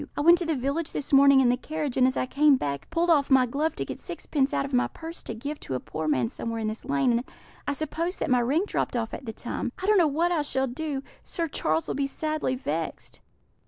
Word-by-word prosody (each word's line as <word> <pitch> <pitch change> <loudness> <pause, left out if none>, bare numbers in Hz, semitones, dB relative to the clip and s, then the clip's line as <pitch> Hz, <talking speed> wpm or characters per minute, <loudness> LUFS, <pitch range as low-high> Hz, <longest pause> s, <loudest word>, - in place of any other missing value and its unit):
I - - +1
went 340 +3 +7
to 345 - -2
the 320 - +1
village 280 +5 -2
this 285 - -4
morning 275 0 +7
in 250 - +4
the 245 - +4
carriage, 300 -1 -4
and 255 -1 +5
as 260 - -1
I - - +1
came 285 +2 +4
back, 140 - -3
pulled 340 +1 +2
off 285 -4 +3
my 265 -2 +6
glove 290 +6 -1
to - - -3
get - - -6
sixpence 295 -5 -1
out 275 - 0
of 275 - -8
my 250 - +3
purse 330 +1 -8
to 230 - -6
give 285 +6 -5
to 130 - -5
a - - -1
poor 155 +4 -5
man 130 -6 +2
somewhere 230 - -4
in 220 -1 -2
this 215 +3 -7
lane, 275 -2 +2
and 235 +1 +1 0.4
I 285 - +1
suppose 325 +5 -3
that - - -2
my 250 - +5
ring 275 +9 +2
dropped 410 - -2
off 225 -1 -3
at 270 - -6
the 225 - -4
time. 240 +1 -4
I 375 - -5
don't 415 -1 +5
know 335 - +5
what 325 +5 +1
I 335 -3 +2
shall 265 -2 0
do; 275 +2 -4 0.2
Sir 335 -1 -3
Charles 160 - 0
will - - -1
be 275 -1 0
sadly 310 -2 -2
vexed." 165 - -4
275 Hz, 265 wpm, -26 LUFS, 245-310 Hz, 0.4 s, went